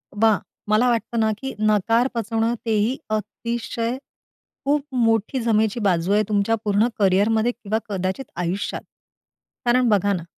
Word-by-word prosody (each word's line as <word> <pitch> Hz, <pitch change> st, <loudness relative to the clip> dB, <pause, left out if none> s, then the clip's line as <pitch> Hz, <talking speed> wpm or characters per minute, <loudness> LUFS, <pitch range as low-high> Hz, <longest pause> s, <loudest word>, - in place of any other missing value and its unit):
बा 220 Hz, 0 st, +4 dB, 0.3 s
मला 215 Hz, +4 st, +4 dB
वाटतं 235 Hz, 0 st, -1 dB
ना, 220 Hz, -1 st, +2 dB
की 265 Hz, +2 st, -5 dB
नकार 215 Hz, +3 st, +3 dB
पचवणं 225 Hz, 0 st, 0 dB
तेही 225 Hz, +3 st, +1 dB
अतिशय 230 Hz, +3 st, -3 dB, 0.7 s
खूप 285 Hz, +1 st, +2 dB
मोठी 225 Hz, +1 st, +1 dB
जमेची 220 Hz, -1 st, +1 dB
बाजू 185 Hz, -3 st, +1 dB
आहे 210 Hz, +1 st, +4 dB
तुमच्या 210 Hz, +2 st, +2 dB
पूर्ण 210 Hz, +2 st, +2 dB
करियरमध्ये 210 Hz, +4 st, +3 dB
किंवा 220 Hz, -3 st, -3 dB
कदाचित 190 Hz, +5 st, -2 dB
आयुष्यात. 175 Hz, +3 st, -2 dB, 0.8 s
कारण 245 Hz, 0 st, +3 dB
बघा 205 Hz, -1 st, +3 dB
ना, 175 Hz, -4 st, -3 dB
220 Hz, 135 wpm, -22 LUFS, 205-235 Hz, 0.8 s, बा